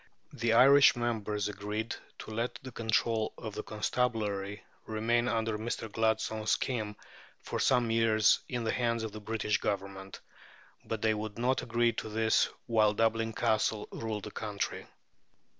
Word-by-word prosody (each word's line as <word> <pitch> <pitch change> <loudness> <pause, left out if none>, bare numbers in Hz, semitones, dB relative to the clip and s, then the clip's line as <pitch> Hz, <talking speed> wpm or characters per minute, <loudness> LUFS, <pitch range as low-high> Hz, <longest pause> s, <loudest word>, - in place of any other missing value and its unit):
The 115 -1 +1
Irish 140 +4 +7
members 110 -3 -1
agreed 105 +2 -4 0.2
to - - -9
let 115 +3 -2
the 130 - -7
control 110 -1 0
of 110 -2 -6
the - - -4
constabulary 105 -3 -2 0.2
remain, 115 +2 +1
under 110 -2 0
Mr. 115 -1 -4
Gladstone's 110 0 0
scheme, 110 -5 0 0.5
for - - -3
some 120 -3 +3
years 110 -1 +4
in 120 -2 -2
the 115 - 0
hands 115 -2 0
of 110 - -4
the 110 +1 -8
British 105 0 -1
Government; 95 -1 -4 0.6
but 110 -1 -4
they 110 -1 +4
would 105 0 -5
not 125 +2 +1
agree 120 0 +1
to - - -5
this 110 +1 +2 0.2
while 110 -3 +3
Dublin 115 0 +1
Castle 110 -1 0
ruled 110 -3 -4
the 105 - -7
country. 105 -2 -4
110 Hz, 150 wpm, -31 LUFS, 105-115 Hz, 0.6 s, Irish